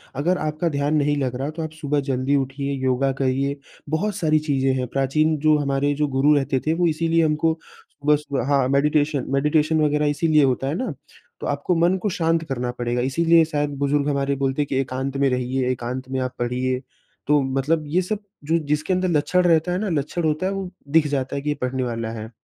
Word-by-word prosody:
अगर 175 +6 +1
आपका 155 +2 -1
ध्यान 145 0 0
नहीं 145 0 +1
लग 130 -3 -1
रहा, 135 +4 -3
तो 160 +1 -5
आप 160 - -5
सुबह 145 0 0
जल्दी 130 +2 +1
उठिए, 140 +1 -2
योगा 130 +1 +2
करिए, 135 +2 0 0.3
बहुत 195 +6 -1
सारी 155 -2 +2
चीज़ें 135 -1 +2
हैं। 125 -1 -2
प्राचीन 150 +4 +1
जो 155 +1 +4
हमारे 145 0 0
जो 150 +1 0
गुरु 145 +3 +5
रहते 135 -2 +1
थे, 160 - +3
वो 175 +1 +2
इसीलिए 165 +1 +1
हमको 155 +1 +2 0.5
सुबह-सुबह 145 -3 +1
हाँ, 140 -2 +3
मेडिटेशन 145 0 +2
मेडिटेशन 150 +3 +2
वग़ैरह 150 0 +2
इसीलिए 150 0 +3
होता 135 0 +1
है 145 - -1
ना? 225 - -3 0.5
तो - - -4
आपको 145 +5 0
मन 170 +3 +3
को 210 - 0
शांत 165 -3 0
करना 125 -2 -2
पड़ेगा। 120 0 -2
इसीलिए 165 +6 +4
शायद, 145 -2 -1
बुज़ुर्ग 140 +1 +1
हमारे 140 0 0
बोलते 135 +1 0
हैं 145 - -1
कि 135 - -3
एकांत 135 +1 -3
में 140 0 +3
रहिए, 125 0 -1
एकांत 130 +1 -4
में 130 - -2
आप 130 0 -3
पढ़िए। 125 +1 -1 0.5
तो 150 -1 +4
मतलब 135 +4 0
ये 175 +5 +1
सब 200 +3 -3 0.2
जो 160 +3 +1
जिसके 150 +5 0
अंदर 185 0 +1
लक्षण 170 +3 +2
रहता 170 0 +3
है 180 - 0
ना, 210 0 -2
लक्षण 160 +2 -2
होता 155 +3 0
है, 190 - 0
वो 195 -2 -4 0.2
दिख 155 +1 +3
जाता 135 -2 -2
है 140 - -2
कि 150 - -3
ये 145 - 0
पढ़ने 130 +1 -1
वाला 115 -2 -3
है। 110 - -7
145 Hz, 215 wpm, -22 LUFS, 135-155 Hz, 0.5 s, गुरु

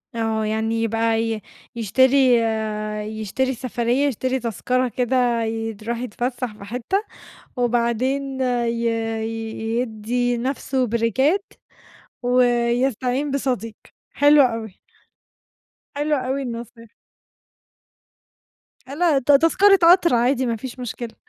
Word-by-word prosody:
آه، 220 -1 -1
يعني 225 +1 -1
يبقى 225 0 +1
ي 225 -1 -2 0.3
يشتري 260 +3 +4 0.8
يشتري 260 +5 -1
سفرية 245 +2 0
يشتري 260 +1 -1
تذكرة 250 +2 -1
كده 245 -1 +1
يد 225 -1 -4
يروح 235 +2 -2
يتفسّح 245 0 -3
في - - -11
حتة، 250 - -2 0.5
وبعدين 250 +3 0
ي 235 -2 0 0.9
يدّي 245 +1 -1
نَفْسه 260 +1 -1
بريكات 265 - 0 0.7
ويستعين 245 +2 +1
بصديق 245 -6 -2 0.4
حلو 290 0 +6
أوي. 225 -6 -1 1.2
حلوة 295 +1 0
أوي 260 +2 -2
النصيحة. 230 -2 -8 2.0
لأ 320 -3 +2
ت 270 +2 +2
تذكرة 375 +7 +5
قطر 350 -5 +4
عادي 255 +2 +2
ما 235 - -1
فيش 250 +3 -8
مشكلة. 240 -1 -6
245 Hz, 100 wpm, -22 LUFS, 230-265 Hz, 2.0 s, حلو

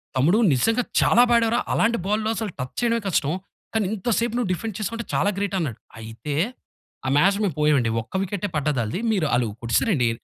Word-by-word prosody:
"తమ్ముడు 155 +11 +3 0.2
నిజంగా 225 - +2 0.2
చాలా 240 - +5
బా 240 - +5
ఆడావు 230 -1 +2
రా. - - +3
అలాంటి 235 +1 +2
బాల్లు 215 +2 0
అసలు 210 -1 -3
టచ్ 125 0 -5
చెయడమే 235 -1 +2
కష్టం, 155 -4 +1 0.4
కానీ 220 -3 +1
ఇంత 220 +3 -3
సేపు 235 0 -1
నువ్వు 235 -7 -1
డిఫెండ్ 215 +3 -5
చేసుకుంటా 230 +2 -3
చాలా 205 - +2
గ్రేటన్నాడు." 185 - -2 0.2
అయితే, 115 +6 -6 0.7
ఆ 130 - 0
మ్యాచ్‌ 195 +6 +4
మేము 185 -8 -1
పోయామండి. 145 -6 +3
ఒక్క 115 - -17
వికెట్టే 200 +1 -3
పడ్డదాళ్ళది. 140 - -1
మీరు 185 -7 +1
ఆళ్ళూ 120 -2 +2
కొట్టేసారండి. 120 - +2
190 Hz, 180 wpm, -23 LUFS, 140-225 Hz, 0.7 s, చాలా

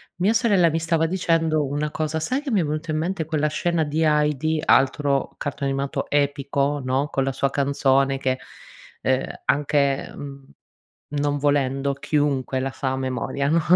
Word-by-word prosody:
mia 195 +6 +2
sorella 205 -7 +4
mi 165 +1 -1
stava 165 0 +1
dicendo 165 -3 +1
una 145 +2 -2
cosa 155 +1 -2
sai 255 - -1
che 290 -2 -5
mi 210 - +3
è - - +2
venuto 155 +2 -3
in 155 - 0
mente 170 +2 -1
quella 155 -1 0
scena 165 +1 0
di 150 +2 -1
Heidi, 150 0 +1
altro 135 +1 +2
cartone 140 -1 -3
animato 135 0 -2
epico, 140 0 0
no, 130 +3 0
con 135 -2 -1
la 135 - 0
sua 140 +1 0
canzone 135 -1 +2
che, 130 -1 -1 0.6
ehm, 130 0 +1 0.2
anche, 140 -1 +1
mhmm, 140 -1 -9 0.8
non 145 0 0
volendo 140 -1 +1
chiunque 140 -2 0
la 135 0 -2
sa 130 -1 -2
a 130 - -2
memoria, 130 +1 -2
no, 165 +1 +3
145 Hz, 170 wpm, -23 LUFS, 135-160 Hz, 0.8 s, sorella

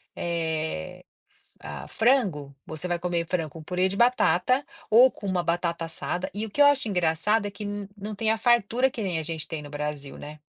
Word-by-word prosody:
eh, 160 - -2 0.3
f - - -25
ah, 70 -2 -7
frango, 195 - +1
você 160 +3 -5
vai 175 -1 -1
comer 170 -1 -1
frango 165 -4 -1
com 160 +2 -11
purê 180 +3 +1
de 195 - -4
batata, 245 - +3 0.3
ou 245 +4 +8
com 205 - -11
uma 185 -2 +1
batata 170 -1 -1
assada, 175 +2 -3
e 210 +3 -2
o - - -7
que 290 - +1
eu 285 - +9
acho 275 -5 +3
engraçado 185 +3 +1
é 200 - -6
que 205 +1 -7 0.3
não 210 +2 -5
tem 220 +2 -1
a 220 - +3
fartura 240 +2 +3
que 245 -5 -5
nem 180 -5 -1
a 160 - -2
gente 160 -1 -5
tem 160 -3 -5
no 145 - -9
Brasil, 145 -1 -4
né? 150 +1 -9
180 Hz, 210 wpm, -26 LUFS, 160-220 Hz, 0.3 s, eu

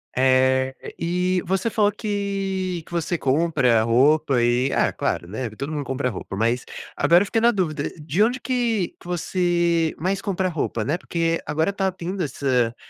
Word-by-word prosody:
Eh, 130 0 +3 0.2
e 180 +2 0
você 190 +5 -1
falou 210 -1 +3
que 195 -4 -3
que - - -18
você 170 0 -1
compra 135 -5 +2
roupa 135 +2 +3
e 125 +3 +2
ah, - - +1
claro, 85 - -2
né, 110 +6 -4
todo 140 +8 -6
mundo 150 -2 -2
compra 135 -1 -2
roupa 95 -1 -7
mas, 115 +4 0 0.3
agora 175 +3 +4
eu - - -5
fiquei 225 +3 0
na 235 - +5
dúvida, 165 -10 -1
de 155 +6 -1
onde 245 +4 +2
que 235 -7 0
que - - -15
você 175 -2 +1
mais 195 +3 -1
compra 190 -1 -1
roupa, 145 -9 -2
né? 160 +5 -1
Porque 165 -1 -1
agora 160 +6 0
tá 195 -1 0
tendo 185 +1 -5
essa 125 -5 0
165 Hz, 170 wpm, -23 LUFS, 130-190 Hz, 0.3 s, na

